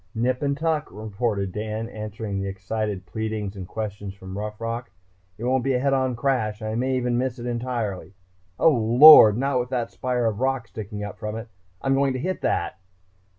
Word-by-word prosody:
"Nip 125 +3 0
and 140 -1 0
tuck," 155 -1 0
reported 105 -2 -2
Dan, 110 +2 -4
answering 105 -2 -5
the 100 - -3
excited 95 0 -4
pleadings 110 -2 -4
and 95 -2 -7
questions 100 -2 -5
from 95 -1 -9
Rough 105 +1 -5
Rock. 115 +1 -4 0.5
"It 115 - -8
won't 130 0 +1
be 135 -1 +1
a - - +1
head 135 +1 +1
on 130 -2 +1
crash. 120 -5 0
I 110 0 -3
may 130 +3 0
even 125 -1 0
miss 130 -1 -2
entirely.... 120 -6 -4 0.4
Oh, 165 - +5
Lord! 115 -1 +9
Not 135 0 +1
with 125 0 -3
that 120 -3 -2
spire 125 -2 -1
of 110 -2 -1
rock 130 -2 0
sticking 105 -2 -7
up 105 - -7
from 105 -1 -4
it.... 115 +1 -7 0.3
I'm 135 - +2
going 135 0 +2
to 130 - -3
hit 185 +7 -3
that - - -1
115 Hz, 195 wpm, -24 LUFS, 105-130 Hz, 0.5 s, Lord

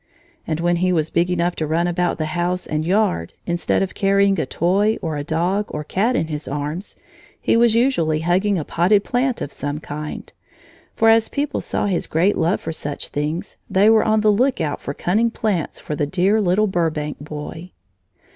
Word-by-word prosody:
And 160 -1 -1
when 175 +1 +1
he 185 +1 +1
was 160 -3 0
big 170 +1 +1
enough 175 0 0
to 155 - -1
run 165 +3 +1
about 175 0 0
the 155 - -1
house 180 +1 -1
and 155 0 -2
yard, 185 - 0
instead 175 +2 0
of 190 - -4
carrying 195 -1 +2
a 140 - -1
toy 200 - +1
or 160 -2 -3
a 145 - -3
dog 175 +7 0
or 150 - -5
cat 215 +11 0
in 165 - +1
his 150 -3 -5
arms, 150 +7 -4 0.4
he - - +1
was 230 -1 +4
usually 170 - +2
hugging 185 +4 +1
a 155 - -3
potted 195 +4 +2
plant 250 +2 0
of 145 - -7
some 145 +2 -4
kind, 150 0 -7 0.6
for 225 - +4
as 225 0 +4
people 285 +1 -2
saw - - -2
his 190 -4 -1
great 180 +6 +2
love 170 +4 +1
for 160 - -5
such 145 -2 -5
things, 155 +6 -3
they 205 +3 +5
were 220 -1 +5
on 215 0 +2
the 215 0 +4
lookout 220 - 0
for 140 - -5
cunning 220 +6 +1
plants 210 -8 -2
for 150 - -5
the 145 0 -1
dear 190 +7 +2
little 195 +2 +2
Burbank 160 -6 -1
boy. 150 +4 -7
175 Hz, 195 wpm, -21 LUFS, 155-205 Hz, 0.6 s, they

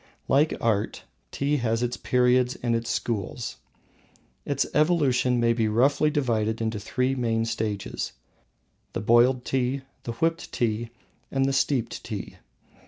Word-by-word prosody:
Like 145 +3 +3
Art, 110 -3 0 0.3
Tea 145 +2 0
has 115 -2 0
its 120 0 -1
periods 125 0 +2
and 120 -1 +2
its 115 0 -2
schools. 115 +1 -3 0.9
Its 140 -1 0
evolution 140 -6 +3
may 115 0 +3
be 115 -2 +1
roughly 135 +7 +3
divided 115 -6 0
into 110 -1 -2
three 125 +5 0
main 115 -3 0
stages: 110 -3 -3 0.8
the - - -2
Boiled 120 +3 +4
Tea, 130 +1 0 0.2
the 115 - -5
Whipped 165 +7 -1
Tea, 115 0 -1 0.4
and 135 0 +1
the 135 - +1
Steeped 135 -2 0
Tea. - - -6
125 Hz, 135 wpm, -26 LUFS, 115-135 Hz, 0.9 s, Boiled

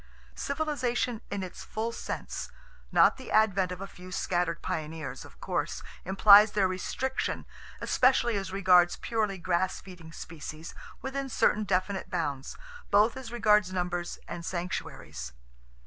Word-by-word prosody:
Civilization 255 -6 -1
in 200 -1 -3
its 185 - -8
full 225 +2 -3
sense—not - - -1
the 260 - -10
advent 195 -4 +3
of 180 +1 -6
a - - -3
few 185 0 -12
scattered 175 -2 -1
pioneers—of 155 -2 -5
course, - - -2 0.2
implies 205 +3 +7
their 200 -2 +3
restriction, 255 +8 -2 0.4
especially 255 -3 +3
as 195 -2 -3
regards 180 -2 +5
purely 215 -4 -1
grass 180 +1 0
feeding 180 -4 -12
species, 160 0 -8 0.3
within 270 0 -3
certain 215 -3 +2
definite 190 0 -1
bounds, 145 -6 -3 0.3
both 210 +3 +4
as 260 -3 -7
regards 210 -5 +3
numbers 175 -1 -2
and 170 - -6
sanctuaries. 170 - -5
190 Hz, 125 wpm, -29 LUFS, 175-220 Hz, 0.4 s, implies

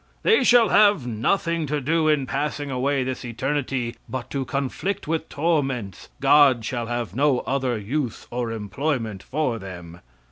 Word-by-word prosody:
"They 445 -8 +4
shall 240 -4 +6
have 205 -10 +5
nothing 165 - 0
to 150 +1 -1
do 155 +4 +1
in 150 -3 +2
passing 145 +1 -3
away 135 +1 0
this 130 +1 -4
eternity 130 0 -2
but 130 - -5
to 135 -2 -2
conflict 140 +9 -3
with 160 0 -2
torments. 135 - -1
God 135 -4 +5
shall 120 -1 -3
have 120 -3 -3
no 140 -1 +2
other 130 -3 -1
use 120 +4 -3
or 120 -1 -2
employment 115 -1 -3
for 130 -5 -2
them." 90 -3 -9
135 Hz, 150 wpm, -24 LUFS, 120-150 Hz, -, shall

